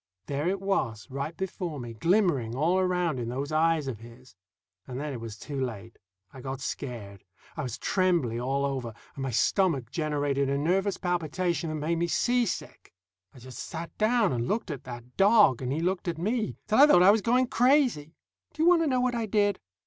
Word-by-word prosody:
There 145 +3 -2
it 190 +2 0
was, 185 - -1
right 140 +5 -4
before 180 -5 -4
me, 120 -2 -7
glimmering 150 - +1
all 165 +7 +2
around 180 -6 0
in 120 -1 -3
those 135 +4 -4
eyes 160 -1 +2
of 120 -6 -4
his. 120 +2 -15 0.5
And 130 0 -5
then 150 0 -4
it 120 - -6
was 110 -2 -7
too 140 +1 -5
late. 115 -2 -7 0.3
I 130 - -10
got 135 +1 -5
scared. 110 -9 -6 0.3
I - - -3
was 125 -2 -4
trembly 170 - +1
all 135 +3 0
over, 130 -5 -3 0.2
and 140 - -7
my 135 - -2
stomach 135 - +1
generated 145 -3 0
a 140 - 0
nervous 185 +6 +1
palpitation 175 0 -1
that 155 - -3
made 155 +3 -1
me 170 - +1
seasick. 240 - -1 0.4
I - - -13
just 130 0 -11
sat 165 +1 -7
down 220 - +3
and 120 0 -2
looked 215 -5 -1
at 140 - -7
that 120 0 -10
dog, 200 - +5
and 130 0 -2
he 155 +4 -1
looked 185 +2 -1
at 170 -2 -2
me, 215 +6 -1
till 215 - +2
I 290 - +9
thought 180 -11 +6
I 195 - +8
was 215 +1 +2
going 250 +4 +3
crazy. 245 - +2 0.4
Do 310 +1 -1
you 340 - +6
want 350 -2 +5
to 325 - +1
know 255 -3 +1
what 250 0 +1
I 230 -2 -2
did? 205 -2 +1
155 Hz, 205 wpm, -28 LUFS, 130-195 Hz, 0.5 s, I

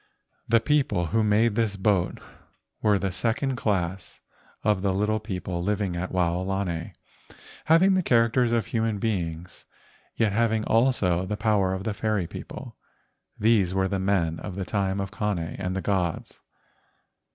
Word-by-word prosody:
The 115 0 +5
people 135 -7 +1
who 115 -1 +3
made 105 +2 +3
this 110 -2 0
boat 95 -2 +1 0.6
were 105 -2 +3
the 95 -1 -2
second 115 +8 -1
class 95 -5 -2 0.4
of 105 -3 +2
the 95 -1 0
little 105 +2 +1
people 90 -4 -4
living 100 -1 -1
at 90 +2 -3
Wao¬ 90 -1 0
lani, 95 -4 -3 0.7
having 175 +5 +5
the 185 - +3
characters 115 -4 +3
of 115 -3 +1
human 115 -2 -1
beings, 90 -5 -3 0.5
yet 110 -2 +2
having 110 0 +1
also 105 -7 +2
the 105 - -3
power 105 -3 +1
of 95 - -5
the 110 - -2
fairy 105 -1 -1
people. - - -9 0.6
These 105 -4 +2
were 95 0 +2
the 95 0 -2
men 95 -4 0
of 95 - -7
the 95 -1 -3
time 100 -1 -1
of 95 -1 -3
Kane 105 0 -1
and 90 +3 -4
the 95 - -2
gods. 90 -5 -2
100 Hz, 155 wpm, -26 LUFS, 95-110 Hz, 0.7 s, The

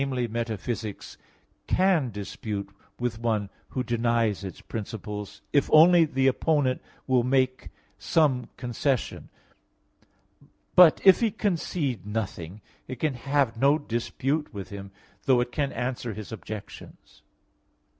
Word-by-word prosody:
metaphysics, 115 -4 -3 0.5
can 180 -8 +3
dispute 100 -1 -5 0.3
with 120 -2 -2
one 110 -4 -1 0.2
who 130 - -2
denies 115 -4 0
its 95 - -7
principles, 105 -1 -6
if 140 - +3
only 165 +2 +7
the 135 -3 0
opponent 135 -1 +2 0.2
will 130 -2 +3
make 130 +1 +1 0.3
some 135 -7 +2
concession; 125 +1 -2 1.5
but 180 -3 +8
if 190 -2 +8
he 230 - +2
concede 165 - -2
nothing, 105 -3 -5 0.3
it 130 - -5
can 155 0 0
have 135 -1 0
no 140 +2 +5
dispute 140 +3 -2
with 100 -3 -7
him, 100 -1 -8 0.4
though 130 -2 +5
it 120 0 -1
can 140 0 -1
answer 125 -2 -3
his 110 -1 -8
objections. 110 -1 -9
125 Hz, 115 wpm, -26 LUFS, 110-140 Hz, 1.5 s, but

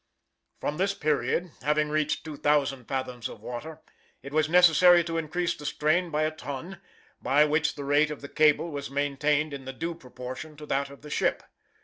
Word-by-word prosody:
From 150 - -3
this 195 +2 +1
period, 155 +3 0
having 150 +2 +1
reached 155 0 0
2,000 145 -4 0
fathoms 125 -3 -4
of - - -10
water, 155 +6 -7 0.4
it 140 +1 -9
was 155 0 +2
necessary 175 0 +6
to 165 0 -2
increase 170 +2 -1
the 150 - -12
strain 155 +4 +1
by 155 -1 0
a 155 - +1
ton, 155 +5 -7 0.4
by 145 +3 +4
which 155 +1 +1
the 145 - -6
rate 145 +2 +3
of 150 - -6
the 140 - -7
cable 155 +3 +3
was 140 -1 -5
maintained 145 +2 0
in 135 -1 -7
due 170 +1 -2
proportion 130 +1 -9
to 150 - -9
that 140 -1 -1
of 140 0 -14
the 150 - -10
ship. - - 0
150 Hz, 180 wpm, -27 LUFS, 140-160 Hz, 0.4 s, necessary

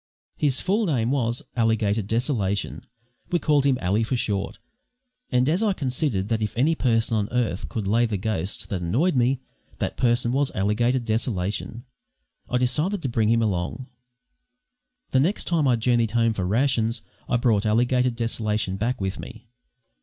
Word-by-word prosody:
His 140 -3 +1
full 205 +3 +1
name 125 -6 +1
was 120 -3 0
Alligator 110 -2 +1
Desolation 105 -2 -1 0.5
(we 175 - +3
called 150 -4 +2
him 135 -2 +3
"Ally" 95 +5 +1
for 115 +4 0
short): 100 -4 -2 0.7
and, 125 0 +3
as 170 +7 +2
I 215 -3 +2
considered 130 - -1
that 115 -1 0
if 105 +1 -3
any 145 +7 +3
person 115 -6 +1
on 105 -1 0
earth 120 -6 -1
could 110 -3 -3
lay 115 +4 +2
the 105 -2 -2
ghost 95 -2 -2
that 95 -3 -2
annoyed 135 - +1
me, 125 +1 +2 0.4
that - - -3
person 120 -1 +2
was 140 +2 +1
Alligator 110 +6 +1
Desolation, 110 -1 -2 0.6
I 125 - +1
decided 155 +10 0
to 135 - -1
bring 110 -2 +1
him 115 0 +3
along. 105 +6 -2 1.2
The 130 - +3
next 175 +10 +1
time 160 -5 +1
I 125 - +4
journeyed 115 -1 +2
home 115 0 +2
for 95 -4 -2
rations 115 +1 +1 0.3
I 120 - +3
brought 115 -4 +2
Alligator 125 +3 +2
Desolation 110 -4 -1
back 120 +5 -1
with 95 0 -3
me. 110 -1 -10
115 Hz, 165 wpm, -24 LUFS, 105-130 Hz, 1.2 s, I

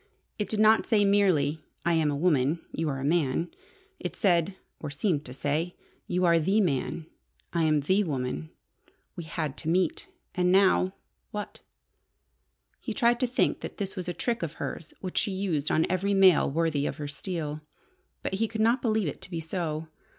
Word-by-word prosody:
It 210 - -2
did 215 - -1
not 220 +1 +5
say 210 -3 +4
merely, 175 -7 +3 0.2
"I 170 - +3
am 160 -2 +2
a 145 - 0
woman. 150 -1 +2
You 160 -1 -1
are 135 -2 -2
a - - -4
man." 160 +1 +1 0.5
It - - -5
said 180 -2 +2 0.2
or 150 - -5
seemed 150 +1 0
to 125 - -7
say 150 +6 -2 0.3
"You 180 +1 +1
are 170 -1 +5
the 190 +7 +2
man. 160 -3 0 0.5
I 170 -2 +2
am 155 -2 +3
the 190 +8 +2
woman. 125 - -3 0.7
We 170 - -6
had 150 -2 -3
to 160 - -3
meet. 180 0 +1 0.3
And 180 0 +2
now 190 0 +4 0.3
what?" 210 0 -6 1.2
He - - -5
tried 240 -1 +3
to 255 - +2
think 245 - +1
that - - -7
this 200 -1 -3
was 180 -2 -4
a - - 0
trick 235 +6 -2
of 165 -2 -3
hers 165 - -6
which 185 -2 -1
she 200 - -1
used 175 -7 -1
on 160 - +3
every 195 +2 0
male 190 -4 +6
worthy 150 -1 0
of - - -4
her 145 - -4
steel. 155 -1 -4 0.6
But - - -3
he 220 +4 +1
could 220 0 -6
not 235 +3 +3
believe 220 -5 +1
it 145 - -5
to - - -11
be 170 -3 -3
so. 160 -1 -3
170 Hz, 190 wpm, -28 LUFS, 150-195 Hz, 1.2 s, male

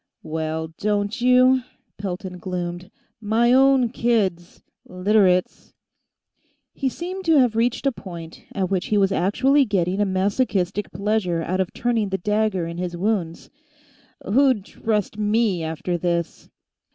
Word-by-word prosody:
"Well, 160 0 -3
don't 210 +3 -1
you?" 255 +1 +5 0.4
Pelton 185 -1 -5
gloomed. 180 0 -5 0.3
"My 225 +3 +2
own 265 -2 +4
kids, 205 -8 -1 0.2
Literates!" 185 0 +1 1.0
He 270 - -1
seemed 365 +7 -6
to 325 -2 +4
have 250 -5 +3
reached 235 +4 0
a 275 - +3
point 170 -7 -10
at 190 -2 -2
which 185 -2 0
he 210 - +1
was 195 -1 +3
actually 260 +10 +3
getting 195 -4 0
a - - +3
masochistic 195 0 -1
pleasure 195 -3 -1
out 185 +3 -2
of 190 -1 -1
turning 230 -4 -1
the 190 - -1
dagger 210 -2 0
in 170 +1 -6
his 175 -1 -4
wounds. 180 -4 -2 0.7
"Who'd 250 -2 +2
trust 215 -2 -2
me, 210 -4 +1
after 160 +2 -3
this?" 170 -1 -2
200 Hz, 135 wpm, -22 LUFS, 180-230 Hz, 1.0 s, you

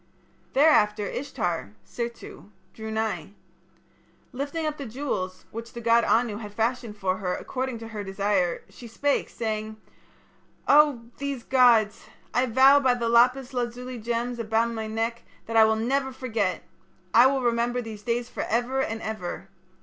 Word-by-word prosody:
"Thereafter 215 -8 +4
Ishtar 175 - -3
(Sirtu) 235 - -7 0.2
drew 220 0 -7
nigh. 215 -6 -2 1.0
Lifting 285 +5 -3
up 305 -1 -2
the 275 - -6
jewels, 215 -7 -4
which 230 +1 -8
the 235 - -6
god 230 0 +4
Anu 225 -3 +2
had 210 -2 -9
fashioned 230 -1 -1
for 190 -2 -1
her 180 -2 -2
according 260 -2 -4
to 225 0 -9
her 210 -2 -5
desire, 195 -2 0
she 240 - -12
spake, 280 +5 0
saying: 215 -1 -4 0.9
'Oh! 290 -4 +5 0.2
these 280 -3 -3
gods! 235 -5 +4 0.3
I 250 +2 +2
vow 265 +4 +6
by 260 -3 +3
the 235 -1 -1
lapis 250 +3 +3
lazuli 245 0 -4
gems 235 +2 -2
upon 230 +1 +1
my 220 -1 -4
neck 225 +2 -2 0.2
that 225 - -5
I 220 -1 +8
will 220 0 +3
never 265 +4 0
forget! 225 -8 -2 0.5
I 240 +3 +8
will 265 -1 0
remember 240 +1 +1
these 220 -3 -7
days 240 +1 -1
for - - -5
ever 245 +4 0
and 225 -3 -3
ever. 195 -3 -5
235 Hz, 155 wpm, -26 LUFS, 215-255 Hz, 1.0 s, I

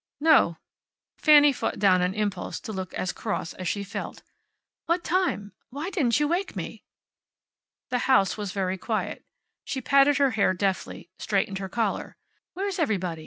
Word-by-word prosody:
"No." 295 - +4 0.6
Fanny 295 -2 +7
fought - - -3
down 185 -3 +4
an 180 +2 0
impulse 205 -3 -2
to 220 - -6
look 190 -2 -5
as 185 - -1
cross 205 -6 -4
as 185 - -6
she 200 +3 -1
felt. 200 - -7 0.6
"What 340 +1 +1
time? 340 - 0 0.2
Why 295 +8 -5
didn't 275 - +2
you 295 - +2
wake 355 +5 -1
me?" - - -6 1.1
The 250 -1 0
house 200 -8 +4
was 205 -3 -4
very 190 -1 -2
quiet. 220 +3 -3 0.4
She 265 - -3
patted 275 +2 +4
her 280 -2 +3
hair 200 -4 +2
deftly, 185 -2 -3
straightened 195 -2 -1
her 190 -1 -5
collar. 220 0 -2 0.4
"Where's 390 0 -3
everybody? 185 - -1
215 Hz, 160 wpm, -26 LUFS, 190-290 Hz, 1.1 s, Fanny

